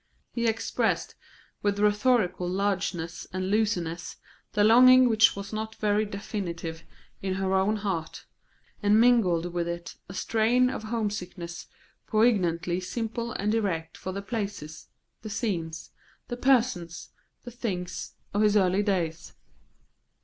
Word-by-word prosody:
He 235 -1 -1
expressed 225 0 0 0.5
with 205 -1 0
rhetorical 210 -3 +2
largeness 180 -3 -2
and 185 +1 -2
looseness 175 -6 -1 0.4
the 205 - +3
longing 255 +3 +8
which 225 -1 +5
was 200 +1 -7
not 220 +1 -4
very 210 0 +1
definite 175 -5 -5 0.4
in 190 -1 -2
her 190 0 -1
own 190 +3 +2
heart, 195 -6 -4 0.6
and 205 +1 +4
mingled 185 -8 +3
with 170 -1 -1
it 170 0 -6
a 185 - -8
strain 235 +5 +2
of 220 - -5
homesickness 200 -6 -4 0.4
poignantly 185 -6 +2
simple 230 +4 -4
and 210 +2 -1
direct 180 -8 -1
for 185 - -6
the 200 +1 -5
places, 200 -8 -5 0.3
the 215 - -7
scenes, 170 -7 -3 0.4
the 240 - -2
persons, 245 -10 +1 0.3
the 245 - -8
things, 185 -7 -4 0.2
of 205 - +1
his 210 0 +4
early 190 0 +3
days. 175 -6 -2
200 Hz, 130 wpm, -27 LUFS, 175-220 Hz, 0.6 s, longing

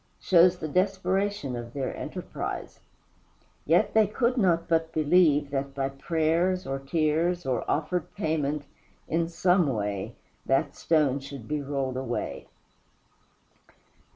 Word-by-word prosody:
shows 180 0 +5
the 160 - -4
desperation 190 -3 0
of 120 0 -7
their 135 -2 -3
enterprise. - - -6 0.9
Yet 175 +7 +3
they 220 -2 +5
could 235 +4 0
not 180 -8 +2
but 165 -1 +1
believe 155 -2 +3
that 135 0 -3
by 135 -1 -1
prayers 165 +6 0
or 135 0 -3
tears 160 +4 0
or 125 -3 0
offered 160 +3 -1
payment 150 -5 -1 0.4
in 165 +1 0
some 175 0 +2
way 105 -6 -2 0.3
that 135 +2 +1
stone 150 -4 +2
should 135 -4 -9
be 150 -1 -2
rolled 135 -2 -2
away. 130 - -4
155 Hz, 125 wpm, -27 LUFS, 135-180 Hz, 0.9 s, shows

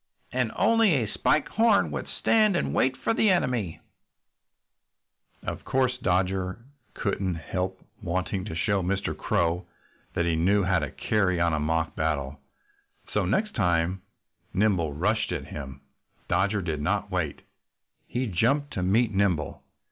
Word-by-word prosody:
And - - 0
only 225 -7 +4
a 115 -6 -1
Spike 155 - +2
Horn 225 -2 +3
would - - -4
stand 215 -3 +2
and - - 0
wait 130 0 +2
for - - 0
the 220 -1 +3
enemy." 125 - 0 1.6
Of - - -5
course 130 -1 +1
Dodger 95 0 0 0.4
couldn't 95 -3 -1
help 95 +3 -3 0.2
wanting 95 0 -2
to 100 - -5
show 100 +4 +1
Mr. 95 +2 -1
Crow 85 +2 0 0.5
that 85 - +1
he 85 -1 +1
knew 100 +5 +3
how 95 0 +2
to 75 -3 -3
carry 95 -1 0
on 85 -1 +2
a 80 - +1
mock 80 +2 0
battle. 75 -3 -1 0.7
So 105 - +2
the - - -2
next 210 - 0
time 90 -2 +1 0.5
Nimble 95 -6 +2
rushed 105 +9 0
at - - -3
him 70 -3 -8 0.5
Dodger 100 0 +1
did 80 -4 -2
not 100 +5 -1
wait. 85 -6 -2 0.6
He 125 +2 -1
jumped 130 - +1
to 90 - -2
meet 105 +5 +2
Nimble. 95 -7 0
95 Hz, 150 wpm, -27 LUFS, 85-110 Hz, 1.6 s, only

